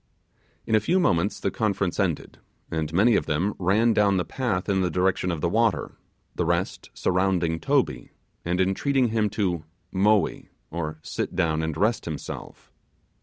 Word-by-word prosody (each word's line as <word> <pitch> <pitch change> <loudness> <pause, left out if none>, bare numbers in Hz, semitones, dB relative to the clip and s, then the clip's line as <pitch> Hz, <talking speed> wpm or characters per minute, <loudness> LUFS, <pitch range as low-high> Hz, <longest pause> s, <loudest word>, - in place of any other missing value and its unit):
In - - -2
a 110 - +6
few 175 - +1
moments 90 - +1
the 100 - -1
conference 100 -3 -1
ended, 90 -6 -1 0.3
and 80 -2 -2
many 105 +7 +4
of - - 0
them 85 +7 0
ran 105 +6 +3
down 100 -2 +3
the 90 - 0
path 120 -9 -2
in 95 -2 +2
the 90 - +1
direction 90 0 +1
of 85 -4 -2
the - - +2
water, 110 +4 +1 0.4
the - - -1
rest - - -1
surrounding 90 -3 +1
Toby, - - 0 0.3
and 90 +1 -1
entreating 125 +7 +2
him 110 -1 +1
to 95 -6 -1 0.3
'Moee', 105 +2 +2 0.2
or 80 -1 -4
sit - - -4
down 80 -3 +1
and 80 -1 -3
rest 110 +5 +1
himself. 80 -3 -7
95 Hz, 165 wpm, -25 LUFS, 85-105 Hz, 0.4 s, a